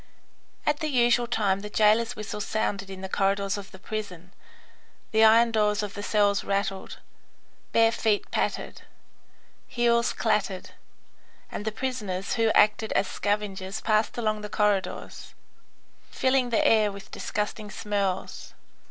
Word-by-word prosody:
At 295 0 +1
the 310 - -2
usual 240 -3 +3
time 205 -5 +1
the 210 +1 -7
jailer's 220 +2 +3
whistle 210 0 -5
sounded 200 -2 -2
in 190 -1 -8
the 190 - -4
corridors 195 +1 0
of 200 -1 -8
the - - -13
prison, 185 -4 -7 0.8
the 220 0 +4
iron 230 +1 +6
doors 210 -1 +1
of 205 -1 -5
the 205 - -6
cells 205 -1 +2
rattled, 195 -1 -2 0.7
bare 225 0 +4
feet 220 -3 0
pattered, - - -2 0.9
heels 235 -1 +2
clattered, - - -1 0.8
and 205 - -5
the 220 - 0
prisoners 210 -6 -3
who 225 -1 +2
acted 215 +1 +3
as 195 - +2
scavengers 205 -1 -2
passed 215 +1 +1
along 215 -2 -1
the 210 - -6
corridors, 205 -2 -1 0.7
filling 260 -1 +1
the 230 - +2
air 215 -2 +4
with 200 +1 -11
disgusting 210 0 -4
smells. 200 -3 -3
210 Hz, 135 wpm, -26 LUFS, 200-225 Hz, 0.9 s, iron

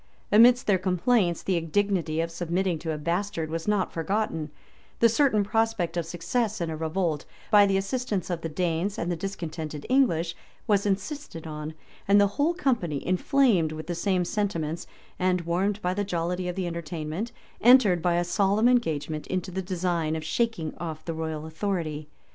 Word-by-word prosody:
Amidst 240 +4 +7
their 195 -3 +3
complaints, 185 0 +1
the 185 -2 +1
indignity 165 -1 0
of 165 0 -3
submitting 175 0 -1
to 160 +1 -3
a 155 - -2
bastard[*] 170 +1 -2
was 165 +2 -4
not 205 -3 +1
forgotten; 165 -2 -1 0.5
the 230 - +7
certain 230 -3 +3
prospect 225 -4 0
of 170 -2 -2
success 215 +6 -1
in 170 -2 -2
a - - -3
revolt, 160 -1 -1 0.3
by 205 -1 +7
the 195 0 +2
assistance 200 -2 -2
of 170 -2 -2
the 165 - -3
Danes 175 +4 -1
and 175 - -2
the - - 0
discontented 160 -5 -5
English, 175 -11 +2 0.3
was 205 -2 +2
insisted 200 - -3
on; 155 0 -6 0.3
and 200 +1 +6
the 205 - +6 0.2
whole 335 +4 +2
company, 230 - -1
inflamed 185 - +3
with 155 0 -6
the 175 - -3
same 180 +1 0
sentiments, 170 -6 -2 0.3
and 180 -1 +2
warmed 185 +5 0
by 180 +1 +1
the 205 +2 -1
jollity 180 -1 -2
of 180 - -3
the 190 -1 -2
entertainment, 170 +4 -4 0.3
entered, 225 -8 +6
by 175 0 +2
a 175 - +2
solemn 200 +5 +2
engagement, 160 - 0
into 185 0 -2
the 190 +1 -2
design 175 -4 -1
of 160 - -4
shaking 190 -1 -1
off 160 -2 -6
the 165 - -3
royal 160 -1 -4
authority. 160 -3 -3
180 Hz, 175 wpm, -27 LUFS, 165-205 Hz, 0.5 s, Amidst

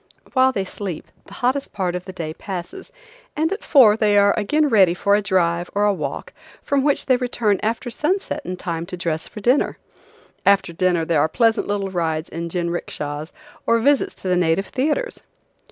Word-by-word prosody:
While 260 -1 +4
they 195 -6 -2
sleep 185 -3 -6 0.2
the - - -13
hottest 260 +3 -1
part 185 -4 -1
of 180 0 -5
the 190 - -7
day 165 -4 -5
passes, 195 - -7 0.4
and 320 +4 0
at 405 - -7
four 245 -8 +6
they 210 -2 +2
are 200 0 +5
again 295 +9 +1
ready 195 -9 +4
for 200 +2 +1
a 210 - +2
drive 175 -3 0
or 205 +1 +2
a 205 - +3
walk, 150 -7 -5 0.3
from 280 -1 +1
which 290 -1 +1
they 255 -2 +3
return 235 -5 0
after 230 +3 -2
sunset 320 +3 -1
in 180 -6 -5
time 170 -2 -4
to 180 - -6
dress 160 -2 -3
for 210 - -10
dinner. 250 +7 +2 0.7
After 195 -3 +3
dinner 175 -1 +1
there 160 -3 +2
are 155 - +2
pleasant 225 +5 +2
little 200 -1 -2
rides 160 -3 -2
in 170 0 -5
jinrickshas 165 -3 -4 0.4
or 230 - +4
visits 280 +3 +2
to - - -8
the 180 - +2
native 180 +2 +1
theaters. 310 - -1
200 Hz, 190 wpm, -21 LUFS, 175-245 Hz, 0.7 s, four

